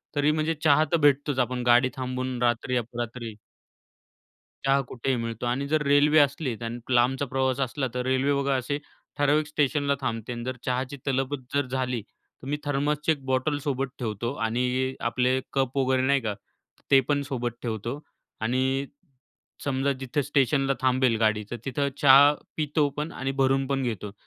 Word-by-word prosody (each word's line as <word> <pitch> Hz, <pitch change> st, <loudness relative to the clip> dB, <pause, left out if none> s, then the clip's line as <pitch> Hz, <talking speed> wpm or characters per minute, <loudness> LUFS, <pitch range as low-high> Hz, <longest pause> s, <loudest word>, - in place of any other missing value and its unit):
तरी 145 Hz, +1 st, +3 dB
म्हणजे 155 Hz, +1 st, 0 dB
चहा 155 Hz, -1 st, +5 dB
तर 170 Hz, -, +4 dB
भेटतोच. 145 Hz, -2 st, +2 dB
आपण 125 Hz, 0 st, 0 dB
गाडी 120 Hz, +2 st, +5 dB
थांबवून 130 Hz, -1 st, -3 dB
रात्री 120 Hz, +1 st, +1 dB
अपरात्री. 120 Hz, 0 st, -5 dB, 1.3 s
चहा 135 Hz, 0 st, +4 dB
कुठेही 130 Hz, +2 st, -2 dB
मिळतो 115 Hz, 0 st, -4 dB
आणि 130 Hz, +4 st, -1 dB
जर 155 Hz, +1 st, +1 dB
रेल्वे 145 Hz, +2 st, +5 dB
असली 140 Hz, -3 st, +1 dB
आणि 115 Hz, +1 st, -4 dB
लांबचा 130 Hz, +3 st, +3 dB
प्रवास 130 Hz, 0 st, 0 dB
असला 135 Hz, +1 st, -1 dB
तर 125 Hz, -, -1 dB
रेल्वे 130 Hz, +2 st, +2 dB
बघा 140 Hz, 0 st, +1 dB
असे, 130 Hz, +3 st, -1 dB, 0.4 s
ठराविक 150 Hz, +1 st, +2 dB
स्टेशनला 145 Hz, -1 st, +1 dB
थांबते 115 Hz, -1 st, -3 dB
आणि 120 Hz, 0 st, -6 dB
जर 130 Hz, +1 st, -3 dB
चहाची 130 Hz, +2 st, -2 dB
तलबच 135 Hz, +1 st, -1 dB
जर 140 Hz, -2 st, +1 dB
झाली. 125 Hz, -2 st, -2 dB
तर 125 Hz, +4 st, -18 dB
मी 145 Hz, +1 st, -1 dB
थर्मसची 145 Hz, +2 st, 0 dB
एक 145 Hz, -4 st, -2 dB
बॉटल 130 Hz, +3 st, 0 dB
सोबत 135 Hz, -1 st, -1 dB
ठेवतो 115 Hz, +1 st, -3 dB
आणि 125 Hz, +3 st, 0 dB
आपले 125 Hz, +2 st, +1 dB
कप 135 Hz, -1 st, 0 dB
वगैरे 130 Hz, -1 st, +2 dB
नाही 140 Hz, -1 st, +3 dB
का, 110 Hz, -3 st, -2 dB, 0.6 s
ते 135 Hz, -, +8 dB
पण 145 Hz, -1 st, +2 dB
सोबत 120 Hz, -3 st, -2 dB
ठेवतो 115 Hz, +3 st, -4 dB, 0.4 s
आणि 130 Hz, +4 st, 0 dB, 0.8 s
समजा 140 Hz, 0 st, 0 dB
जिथे 135 Hz, +2 st, -1 dB
स्टेशनला 135 Hz, 0 st, +2 dB
थांबेल 130 Hz, -2 st, +3 dB
गाडी 110 Hz, -1 st, +2 dB
तर -, -, -2 dB
तिथं 140 Hz, +2 st, -1 dB
चहा 140 Hz, +1 st, +8 dB, 0.2 s
पितो 150 Hz, -1 st, +1 dB
पण 150 Hz, +3 st, -3 dB
आणि 135 Hz, -4 st, -3 dB
भरून 135 Hz, 0 st, +2 dB
पण 135 Hz, -1 st, -1 dB
घेतो. 110 Hz, -4 st, -3 dB
130 Hz, 165 wpm, -26 LUFS, 125-140 Hz, 1.3 s, ते